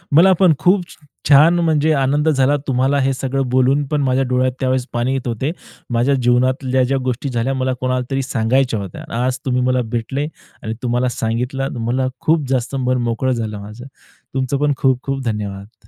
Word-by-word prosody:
मला 180 Hz, +5 st, +7 dB
पण 185 Hz, -4 st, +5 dB
खूप 185 Hz, +1 st, +3 dB
छ -, -, -13 dB, 0.3 s
छान 160 Hz, +5 st, +6 dB
म्हणजे, 160 Hz, -2 st, +2 dB
आनंद 145 Hz, +2 st, +1 dB
झाला 140 Hz, -1 st, +3 dB
तुम्हाला 135 Hz, +2 st, +1 dB
हे 135 Hz, 0 st, +1 dB
सगळं 135 Hz, 0 st, -2 dB
बोलून, 130 Hz, +3 st, +2 dB
पण 150 Hz, 0 st, 0 dB
माझ्या 135 Hz, 0 st, +1 dB
डोळ्यात 130 Hz, 0 st, +2 dB
त्यावेळेस 130 Hz, -1 st, 0 dB
पाणी 120 Hz, +2 st, 0 dB
येत 135 Hz, -1 st, -3 dB
होते. 120 Hz, +5 st, -2 dB, 0.4 s
माझ्या 120 Hz, +4 st, +2 dB
जीवनातल्या 130 Hz, +1 st, +2 dB
ज्या 135 Hz, +2 st, 0 dB
गोष्टी 130 Hz, +3 st, -2 dB
झाल्या, 125 Hz, +1 st, -1 dB
मला 130 Hz, -1 st, -1 dB
कोणालातरी 130 Hz, +1 st, -1 dB
सांगायच्या 120 Hz, -1 st, +1 dB
होत्या. 95 Hz, -3 st, -7 dB, 0.2 s
आज 130 Hz, 0 st, -1 dB
तुम्ही 125 Hz, -1 st, +1 dB
मला 125 Hz, 0 st, +1 dB
भेटले 135 Hz, +5 st, -2 dB, 0.4 s
आणि 110 Hz, -, -3 dB
तुम्हाला 125 Hz, +1 st, +1 dB
सांगितलं, 125 Hz, +4 st, -2 dB
मला 130 Hz, +2 st, 0 dB
खूप 155 Hz, -2 st, +2 dB
जास्त 130 Hz, 0 st, -1 dB
मन 130 Hz, 0 st, +2 dB
मोकळं 120 Hz, +3 st, 0 dB
झालं 110 Hz, -4 st, -3 dB
माझं. 105 Hz, +5 st, -10 dB, 0.5 s
तुमचं 130 Hz, +1 st, -1 dB
पण 145 Hz, -1 st, +2 dB
खूप 130 Hz, -3 st, +1 dB
खूप 135 Hz, -1 st, -3 dB
धन्यवाद. 105 Hz, -1 st, -5 dB
130 Hz, 180 wpm, -18 LUFS, 125-135 Hz, 0.5 s, मला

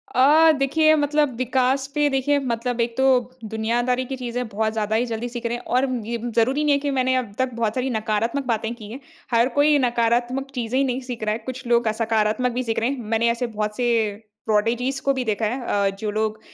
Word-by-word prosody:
अ, 305 Hz, +5 st, +6 dB
देखिए 310 Hz, +3 st, +3 dB
मतलब 295 Hz, -2 st, +1 dB
विकास 260 Hz, +2 st, +1 dB
पे 295 Hz, 0 st, +3 dB
देखिए 275 Hz, +1 st, +1 dB
मतलब 235 Hz, +1 st, -2 dB
एक 235 Hz, 0 st, -2 dB
तो 265 Hz, -1 st, +5 dB, 0.3 s
दुनियादारी 240 Hz, +4 st, -1 dB
की 265 Hz, -, -5 dB
चीज़ें 245 Hz, -1 st, -4 dB
बहुत 220 Hz, +1 st, -1 dB
ज़्यादा 215 Hz, -1 st, -1 dB
ही 235 Hz, +3 st, +2 dB
जल्दी 235 Hz, +1 st, -4 dB
सीख 240 Hz, 0 st, -7 dB
रहे 235 Hz, +1 st, 0 dB
हैं 240 Hz, -, -12 dB
और 265 Hz, +2 st, +2 dB, 0.2 s
ये 235 Hz, +1 st, -3 dB, 0.2 s
ज़रूरी 260 Hz, +6 st, +2 dB
नहीं 295 Hz, -, +3 dB
है 280 Hz, -, +2 dB
कि 285 Hz, -, +1 dB
मैंने 260 Hz, -1 st, +1 dB
अब 245 Hz, -6 st, -2 dB
तक 260 Hz, -2 st, 0 dB
बहुत 225 Hz, -2 st, -1 dB
सारी 255 Hz, +1 st, -1 dB
नकारात्मक 225 Hz, +3 st, -1 dB
बातें 225 Hz, -1 st, -1 dB
की 215 Hz, -3 st, -11 dB
हैं। 255 Hz, -, -7 dB, 0.3 s
हर 235 Hz, +2 st, +3 dB
कोई 295 Hz, 0 st, +5 dB
नकारात्मक 240 Hz, +3 st, 0 dB
चीज़ें 245 Hz, 0 st, -2 dB
ही -, -, +3 dB
नहीं 255 Hz, 0 st, -2 dB
सीख 235 Hz, -3 st, -5 dB
रहा 215 Hz, 0 st, +1 dB
है, -, -, -2 dB
कुछ 260 Hz, 0 st, -6 dB
लोग 235 Hz, -2 st, +3 dB
सकारात्मक 225 Hz, +2 st, +1 dB
भी 250 Hz, +2 st, -2 dB
सीख 225 Hz, -2 st, -1 dB
रहे 230 Hz, -, 0 dB
हैं। 275 Hz, -1 st, -3 dB
मैंने 230 Hz, +1 st, +2 dB
ऐसे 240 Hz, +1 st, -2 dB
बहुत 210 Hz, -1 st, -3 dB
से 225 Hz, -3 st, 0 dB, 0.2 s
प्रोडिजीज़ 235 Hz, +5 st, 0 dB
को 275 Hz, -, +2 dB
भी 260 Hz, -1 st, -2 dB
देखा 220 Hz, 0 st, 0 dB
है 245 Hz, +5 st, -2 dB
अ, 200 Hz, -4 st, +1 dB
जो 215 Hz, -1 st, -2 dB
लोग 215 Hz, 0 st, -1 dB
240 Hz, 225 wpm, -23 LUFS, 225-260 Hz, 0.3 s, अ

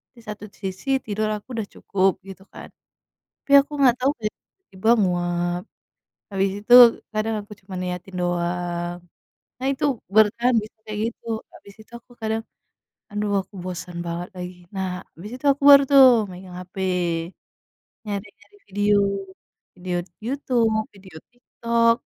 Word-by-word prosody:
di -, -, -16 dB
satu 210 Hz, 0 st, -7 dB, 0.2 s
sisi 190 Hz, +6 st, -6 dB, 0.2 s
tidur 215 Hz, 0 st, -1 dB
aku 205 Hz, -, -10 dB
udah 205 Hz, -, -3 dB
cukup 195 Hz, -1 st, +1 dB
gitu 195 Hz, 0 st, -11 dB
kan. -, -, -10 dB, 0.8 s
Tapi 280 Hz, -, -2 dB
aku 285 Hz, -, -7 dB
nggak 255 Hz, -3 st, +6 dB
tau 275 Hz, -, +4 dB
kayak 215 Hz, -1 st, -3 dB
tiba-tiba 220 Hz, -, -7 dB
nguap, 175 Hz, -1 st, 0 dB, 0.7 s
habis 195 Hz, 0 st, +1 dB
itu, 240 Hz, -, +3 dB, 0.4 s
kadang 215 Hz, +1 st, -1 dB
aku 205 Hz, -, -18 dB
cuma 190 Hz, -1 st, -12 dB
niatin 180 Hz, +1 st, -5 dB
doang. 175 Hz, 0 st, -2 dB, 0.6 s
Nah 265 Hz, -, 0 dB
itu, 275 Hz, -, -4 dB, 0.3 s
bertahan 235 Hz, +3 st, +4 dB
bisa 215 Hz, +1 st, -13 dB
kayak 210 Hz, -1 st, -5 dB
gitu, 230 Hz, -, -20 dB, 0.3 s
habis 200 Hz, -, -15 dB
itu 215 Hz, -, -21 dB
aku 245 Hz, -, -26 dB
kadang, 220 Hz, 0 st, -1 dB, 0.7 s
"Aduh, 210 Hz, 0 st, -2 dB
aku 200 Hz, -, -27 dB
bosan 180 Hz, -1 st, -6 dB
banget 170 Hz, +1 st, -4 dB
lagi." 180 Hz, 0 st, -6 dB, 0.2 s
Nah, 190 Hz, -1 st, -2 dB, 0.3 s
habis 200 Hz, +6 st, -9 dB
itu 260 Hz, -, -19 dB
aku 280 Hz, -, -11 dB
baru 280 Hz, 0 st, +10 dB
tuh, 275 Hz, -1 st, +9 dB, 0.3 s
megang 180 Hz, 0 st, -10 dB
HP, 180 Hz, +1 st, -13 dB, 1.3 s
nyari-nyari 205 Hz, -, -7 dB
video, 205 Hz, +1 st, +2 dB, 0.8 s
video 180 Hz, 0 st, -4 dB, 0.3 s
Youtube, 245 Hz, -4 st, +1 dB, 0.2 s
video 190 Hz, -4 st, -14 dB, 0.2 s
TikTok, 235 Hz, -1 st, +1 dB
200 Hz, 140 wpm, -23 LUFS, 180-225 Hz, 1.3 s, baru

